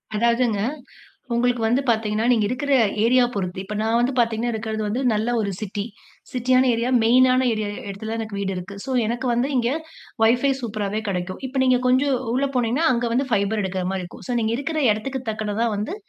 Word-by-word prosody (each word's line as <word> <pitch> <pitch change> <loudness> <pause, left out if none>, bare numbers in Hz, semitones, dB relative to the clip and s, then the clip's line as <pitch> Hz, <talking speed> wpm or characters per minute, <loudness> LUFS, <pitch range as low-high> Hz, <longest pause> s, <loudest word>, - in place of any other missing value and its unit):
அதாவதுங்க. 235 -1 +2 0.8
உங்களுக்கு 240 -1 +1
வந்து 250 +5 +2
பார்த்தீங்கன்னா, 220 0 0
நீங்க 220 -3 +2
இருக்கிற 275 +3 -2 0.3
ஏரியா 250 +1 +5
பொருத்து. 185 -1 -3
இப்ப 210 +2 -6
நான் 225 +1 +2
வந்து 250 +3 +1
பார்த்தீங்கன்னா 230 0 +1
இருக்கிறது 220 0 -3
வந்து 230 +5 -1
நல்ல 215 +2 0
ஒரு 200 -2 -1
சிட்டி. 205 0 -4 0.5
சிட்யான 255 +1 +3
ஏரியா, 235 +2 -1
மெயின் 255 +3 +6
ஆன 255 0 +2
ஏரியா 215 -1 -2 0.2
இடத்தில 220 +3 -5
எனக்கு 220 -2 -5
வீடு 195 -1 -2
இருக்கு. 180 +3 -7
சோ, 270 - -6 0.2
எனக்கு 240 +3 -2
வந்து 245 +4 +1
இங்கே 245 +3 +1 0.5
வைஃபை 245 +5 +4
சூப்பராவே 215 -2 -3
கிடைக்கும். 185 -1 -3
இப்ப 265 +1 -8
நீங்க 255 -1 +4
கொஞ்சம் 260 +1 +3 0.2
உள்ளே 275 +1 +1
போனீங்கன்னா, 250 +7 +1
அங்க 240 0 0
வந்து 265 +3 +1
ஃபைபர் 205 0 +1
எடுக்கிற 190 -1 -2
மாரி 190 -1 -2
இருக்கும். 175 - -12
சோ, - - -1
நீங்க 220 0 0
இருக்கிற 310 +3 -3
இடத்துக்கு 255 +5 -2
தக்கனா 215 +1 -1
வந்து 215 - -3
230 Hz, 185 wpm, -22 LUFS, 210-255 Hz, 0.8 s, மெயின்